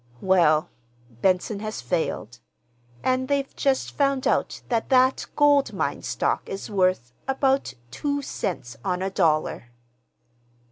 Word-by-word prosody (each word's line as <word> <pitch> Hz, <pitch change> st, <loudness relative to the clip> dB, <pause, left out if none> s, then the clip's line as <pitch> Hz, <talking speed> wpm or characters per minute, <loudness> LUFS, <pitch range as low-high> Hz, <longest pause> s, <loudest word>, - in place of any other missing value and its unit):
"Well, 170 Hz, -5 st, +3 dB, 0.5 s
Benson 190 Hz, +2 st, +1 dB
has 215 Hz, +1 st, -4 dB
failed; 160 Hz, -, -2 dB, 0.6 s
and 255 Hz, 0 st, +1 dB
they've 280 Hz, -1 st, -1 dB
just 270 Hz, -2 st, 0 dB
found 275 Hz, -2 st, +1 dB
out -, -, 0 dB
that 230 Hz, -2 st, 0 dB
that 260 Hz, 0 st, +3 dB
gold 290 Hz, -1 st, +4 dB
mine -, -, -2 dB
stock -, -, -1 dB
is 195 Hz, +2 st, -6 dB
worth—about 190 Hz, -, 0 dB, 0.2 s
two 285 Hz, -, -2 dB
cents 175 Hz, -, -4 dB
on 180 Hz, 0 st, -1 dB
a 195 Hz, -, -2 dB
dollar." 155 Hz, -9 st, +1 dB
210 Hz, 120 wpm, -25 LUFS, 180-270 Hz, 0.6 s, gold